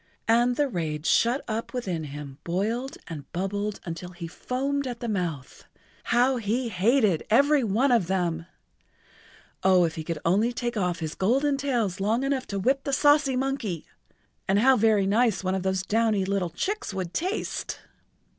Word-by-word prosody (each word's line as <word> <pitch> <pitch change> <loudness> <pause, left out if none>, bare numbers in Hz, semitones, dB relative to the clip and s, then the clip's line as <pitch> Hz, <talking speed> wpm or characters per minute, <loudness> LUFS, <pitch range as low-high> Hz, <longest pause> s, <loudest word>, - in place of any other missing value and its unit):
And 240 +2 +3
the 290 +2 +2
rage 160 - -3
shut 240 +4 +3
up 225 +3 -4
within 180 -10 -3
him 140 -1 -8
boiled 220 +9 -2
and 150 -5 -8
bubbled 200 +3 -2
until 175 +1 -6
he 175 -1 -7
foamed 275 +9 -2
at 240 -2 -5
the 240 - -4
mouth. 175 - -4 0.4
How 250 +2 +3
he 235 +2 -1
hated 210 - +2
every 280 +5 +4
one 230 +6 +2
of 225 -8 +3
them! 175 -3 -1 1.1
Oh, 185 -1 +5
if 165 -2 0
he 160 - -5
could 165 0 -3
only 210 +8 +2
take 240 0 -3
off 180 -5 -1
his 160 -1 -3
golden 270 +9 +1
tails 240 -9 -1
long 220 +6 +1
enough 275 -2 -1
to 200 - -3
whip 265 +7 +1
the 280 - -2
saucy 290 -1 +4
monkey! 255 - -2 0.6
And 195 - +3
how 260 +5 +5
very 215 -3 +3
nice 215 0 +2
one 185 0 0
of 190 - -1
those 190 0 -1
downy 215 -1 +1
little 195 -2 -1
chicks 390 - -3
would 185 -2 -4
taste! 370 - -3
210 Hz, 170 wpm, -26 LUFS, 180-255 Hz, 1.1 s, Oh